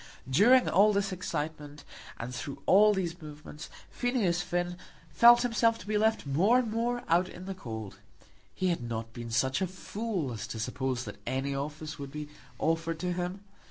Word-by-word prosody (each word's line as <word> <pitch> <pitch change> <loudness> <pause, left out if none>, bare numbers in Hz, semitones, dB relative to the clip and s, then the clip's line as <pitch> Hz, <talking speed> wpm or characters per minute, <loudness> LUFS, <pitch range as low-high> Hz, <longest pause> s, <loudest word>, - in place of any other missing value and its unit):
During 230 - +5
all 210 +4 +5
this 200 -1 0
excitement, 150 -4 -5 0.3
and 120 +2 -6
through 140 +3 -6
all 210 +2 +6
these 180 -3 -2
movements, 150 0 -10 0.2
Phineas 220 -9 0
Finn 175 0 -2 0.3
felt 235 +11 +7
himself 230 -1 +2
to 185 - -12
be 210 +1 -2
left 220 -2 +2
more 180 - +3
and 240 -4 0
more 240 +2 -1
out 175 +2 +3
in 180 - -10
the 195 - -4
cold. 110 - -7 0.6
He 185 - 0
had 170 -7 -1
not 115 -1 -5
been 120 -1 -7
such 130 +7 +1
a 190 - +1
fool 190 - -4
as 110 - -5
to 110 - -6
suppose 125 +1 -2
that - - -9
any 135 +2 -1
office 150 +2 -5
would 140 -1 -6
be 150 0 -6 0.3
offered 165 0 0
to 180 -1 -1
him. 180 +2 -3
170 Hz, 180 wpm, -30 LUFS, 140-200 Hz, 0.6 s, felt